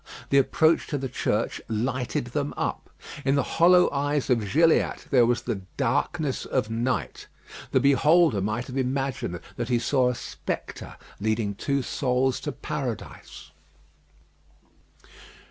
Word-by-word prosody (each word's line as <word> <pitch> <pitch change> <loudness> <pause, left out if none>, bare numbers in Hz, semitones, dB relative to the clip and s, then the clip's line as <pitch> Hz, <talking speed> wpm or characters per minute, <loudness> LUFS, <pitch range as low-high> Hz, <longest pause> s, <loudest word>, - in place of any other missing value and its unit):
The 140 - +6
approach 160 +4 +2
to 145 - -2
the 135 -1 -3
church 115 -3 -1
lighted 125 +2 -1
them 145 -1 -2
up. - - -3 0.3
In 135 0 +2
the 140 - +2 0.2
hollow 180 +1 +7
eyes 145 -1 -1
of 110 -5 +1
Gilliatt 165 +2 +3
there 125 -4 +5
was 120 0 0
the 115 -5 -3 0.2
darkness 145 +3 0
of 120 -4 -1
night. 120 +3 -2 0.4
The - - +3
beholder 140 - +4
might 110 +5 -2
have 130 0 -6
imagined 130 -8 -2 0.2
that 120 0 -3
he 120 - +3
saw 125 +2 +2
a 125 - -2
spectre - - -6 0.2
leading 110 0 0
two 140 +6 -1
souls 130 0 0
to 145 - -4
Paradise. 135 -6 -6
130 Hz, 135 wpm, -26 LUFS, 120-145 Hz, 0.4 s, hollow